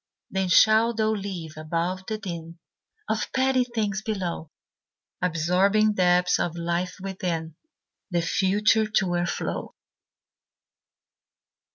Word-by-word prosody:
Then 190 Hz, -1 st, -1 dB
shalt 220 Hz, +4 st, +5 dB
thou 220 Hz, 0 st, +2 dB
live 190 Hz, -7 st, -5 dB
above 170 Hz, +4 st, -2 dB
the 220 Hz, -, -2 dB
din 170 Hz, -5 st, -7 dB, 0.5 s
Of 220 Hz, 0 st, -2 dB
petty 260 Hz, -1 st, +3 dB
things 215 Hz, -4 st, -2 dB
below, 185 Hz, -7 st, -3 dB, 0.7 s
Absorbing 180 Hz, +5 st, +2 dB
depths 180 Hz, -2 st, +3 dB
of 170 Hz, -1 st, -2 dB
life 170 Hz, +2 st, -2 dB
within, 180 Hz, -4 st, -3 dB, 0.6 s
The 175 Hz, -2 st, 0 dB
future 210 Hz, +5 st, +2 dB
to 200 Hz, -3 st, +1 dB
o'erflow." 175 Hz, 0 st, -3 dB
185 Hz, 100 wpm, -25 LUFS, 170-215 Hz, 0.7 s, shalt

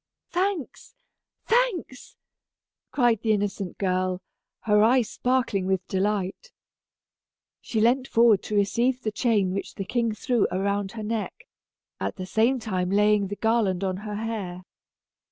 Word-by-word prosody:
"Thanks 360 Hz, -, -2 dB, 0.5 s
thanks," 450 Hz, -, 0 dB, 0.7 s
cried 240 Hz, -5 st, +2 dB
the 220 Hz, -1 st, +2 dB
innocent 200 Hz, -2 st, -2 dB
girl, 185 Hz, -1 st, -1 dB, 0.4 s
her 210 Hz, -1 st, +3 dB
eyes 235 Hz, +1 st, +3 dB
sparkling 245 Hz, -7 st, 0 dB
with 190 Hz, -1 st, -1 dB
delight. 200 Hz, -, -2 dB, 1.1 s
She 225 Hz, -, -2 dB
leant 250 Hz, +4 st, +3 dB
forward 230 Hz, -3 st, +4 dB
to 210 Hz, -, -3 dB
receive 240 Hz, +6 st, +1 dB
the 215 Hz, -, -1 dB
chain 210 Hz, -4 st, +1 dB
which 200 Hz, -, -5 dB
the 195 Hz, -, -4 dB
king 235 Hz, +1 st, 0 dB
threw 240 Hz, -2 st, +1 dB
around 200 Hz, +2 st, -1 dB
her 220 Hz, -2 st, -6 dB
neck, 215 Hz, -2 st, -4 dB, 0.5 s
at 95 Hz, +1 st, -3 dB
the 185 Hz, -, -6 dB
same 225 Hz, +7 st, +2 dB
time 185 Hz, -6 st, -2 dB
laying 205 Hz, 0 st, +3 dB
the 205 Hz, -, -5 dB
garland 215 Hz, -4 st, +1 dB
on 185 Hz, -1 st, -1 dB
her 210 Hz, +1 st, -6 dB
hair. 205 Hz, -5 st, -4 dB
210 Hz, 135 wpm, -25 LUFS, 195-235 Hz, 1.1 s, forward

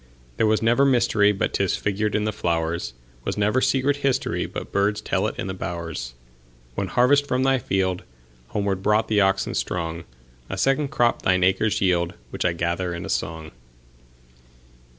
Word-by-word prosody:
There 110 Hz, -, +3 dB
was 110 Hz, +1 st, +2 dB
never 120 Hz, +4 st, +4 dB
mysteryBut 115 Hz, -6 st, +2 dB
'tis 100 Hz, -2 st, +1 dB
figured 105 Hz, +1 st, -1 dB
in 105 Hz, -, +1 dB
the 110 Hz, -, 0 dB
flowers; 85 Hz, -, -2 dB, 0.3 s
SWas -, -, -3 dB
never 105 Hz, +5 st, +2 dB
secret 135 Hz, +2 st, +2 dB
historyBut 135 Hz, -2 st, -2 dB
birds 100 Hz, +1 st, +1 dB
tell -, -, 0 dB
it -, -, -5 dB
in -, -, -3 dB
the 95 Hz, -, -3 dB
bowers. 85 Hz, -8 st, -5 dB, 0.6 s
One 95 Hz, -, -2 dB
harvest 140 Hz, +8 st, +3 dB
from 130 Hz, -1 st, +1 dB
thy 135 Hz, -1 st, +3 dB
fieldHomeward 95 Hz, -, -3 dB
brought 105 Hz, +2 st, +2 dB
the 105 Hz, -1 st, +3 dB
oxen 95 Hz, 0 st, +1 dB
strong;A 65 Hz, -5 st, -5 dB
second 135 Hz, +7 st, +2 dB
crop 120 Hz, -3 st, +1 dB
thine 95 Hz, 0 st, +2 dB
acres 95 Hz, +3 st, +2 dB
yield, 90 Hz, -2 st, +1 dB, 0.2 s
Which -, -, -3 dB
I 90 Hz, -, +2 dB
gather 85 Hz, +1 st, -2 dB
in 85 Hz, -, -6 dB
a -, -, -7 dB
song. 80 Hz, -1 st, -3 dB
95 Hz, 155 wpm, -23 LUFS, 85-110 Hz, 0.6 s, never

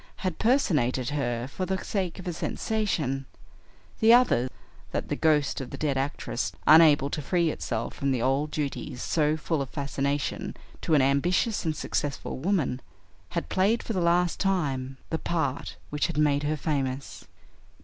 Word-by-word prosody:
had 185 Hz, -3 st, -2 dB
personated 145 Hz, -, +2 dB
her 120 Hz, -4 st, -1 dB
for 165 Hz, +7 st, -5 dB
the 190 Hz, +1 st, 0 dB
sake 185 Hz, -5 st, -2 dB
of 185 Hz, -, -8 dB
a 175 Hz, -, -1 dB
sensation; 160 Hz, -, -1 dB, 0.7 s
the 220 Hz, +1 st, +6 dB
other 235 Hz, -, +5 dB, 0.4 s
that -, -, -3 dB
the -, -, 0 dB
ghost 150 Hz, -3 st, +2 dB
of 130 Hz, -, -6 dB
the 140 Hz, -, -7 dB
dead 145 Hz, -1 st, 0 dB
actress, 135 Hz, -2 st, -2 dB
unable 150 Hz, -3 st, +7 dB
to 150 Hz, -, -3 dB
free 170 Hz, +2 st, +1 dB
itself 115 Hz, -5 st, -3 dB
from 140 Hz, -, -2 dB
the 130 Hz, -, +1 dB
old 135 Hz, +5 st, +1 dB
duties 140 Hz, -4 st, -4 dB
so 155 Hz, -1 st, +1 dB
full 155 Hz, -1 st, -1 dB
of 135 Hz, -, -4 dB
fascination 140 Hz, 0 st, -2 dB, 0.2 s
to 160 Hz, -, +2 dB
an 140 Hz, -, +5 dB
ambitious 175 Hz, -, +1 dB
and 160 Hz, -1 st, 0 dB
successful 145 Hz, -3 st, -3 dB
woman, 150 Hz, -7 st, 0 dB, 0.6 s
had 75 Hz, -, -1 dB
played 200 Hz, -, +2 dB
for 225 Hz, -, -3 dB
the 185 Hz, -, 0 dB
last 175 Hz, +1 st, +2 dB
time 135 Hz, -9 st, -1 dB
the 160 Hz, -, 0 dB
part 160 Hz, -6 st, -2 dB
which 150 Hz, 0 st, 0 dB
had 170 Hz, -, -5 dB
made 145 Hz, -2 st, +3 dB
her 150 Hz, +1 st, -1 dB
famous." 140 Hz, -3 st, -3 dB
150 Hz, 165 wpm, -27 LUFS, 135-175 Hz, 0.7 s, unable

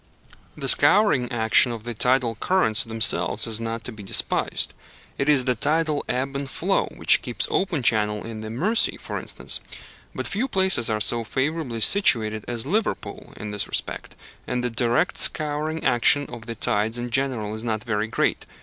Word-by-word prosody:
The -, -, -5 dB
scouring 170 Hz, -, +4 dB
action 115 Hz, +1 st, +2 dB
of 115 Hz, -2 st, -7 dB
the 120 Hz, +1 st, -5 dB
tidal 125 Hz, +1 st, +1 dB
currents 115 Hz, -, +1 dB
themselves 110 Hz, -4 st, +3 dB
is 115 Hz, -1 st, 0 dB
not 115 Hz, 0 st, -5 dB
to -, -, -4 dB
be 110 Hz, -2 st, -11 dB
despised. 95 Hz, -, +1 dB, 0.5 s
It 140 Hz, +1 st, 0 dB
is 135 Hz, -4 st, +4 dB
the 125 Hz, -, +2 dB
tidal 150 Hz, +4 st, 0 dB
ebb 135 Hz, +2 st, -2 dB
and 140 Hz, 0 st, -4 dB
flow 190 Hz, +7 st, -1 dB
which -, -, +3 dB
keeps -, -, -1 dB
open 175 Hz, -8 st, -1 dB
channel 105 Hz, -2 st, 0 dB
in 115 Hz, -1 st, -7 dB
the 110 Hz, -, -7 dB
Mersey, 185 Hz, -, 0 dB
for -, -, -6 dB
instance. -, -, -1 dB, 0.6 s
But -, -, -4 dB
few 230 Hz, +7 st, -2 dB
places 190 Hz, -, +1 dB
are 110 Hz, -1 st, -1 dB
so 115 Hz, +2 st, +2 dB
favourably 130 Hz, -1 st, -3 dB
situated 110 Hz, -, +4 dB
as 120 Hz, -1 st, -2 dB
Liverpool 210 Hz, +9 st, -4 dB
in 105 Hz, 0 st, -7 dB
this 105 Hz, -1 st, -2 dB
respect, -, -, -4 dB, 0.3 s
and 125 Hz, 0 st, -3 dB
the 125 Hz, -, -2 dB
direct 120 Hz, +7 st, 0 dB
scouring 155 Hz, +1 st, 0 dB
action 130 Hz, +3 st, +3 dB
of 115 Hz, 0 st, -10 dB
the 115 Hz, -, -5 dB
tides 110 Hz, +2 st, 0 dB
in 120 Hz, 0 st, -5 dB
general 125 Hz, -5 st, -2 dB
is 110 Hz, +1 st, -4 dB
not 110 Hz, -2 st, -3 dB
very 110 Hz, -2 st, -2 dB
great. 120 Hz, -, -2 dB
120 Hz, 175 wpm, -23 LUFS, 110-145 Hz, 0.6 s, scouring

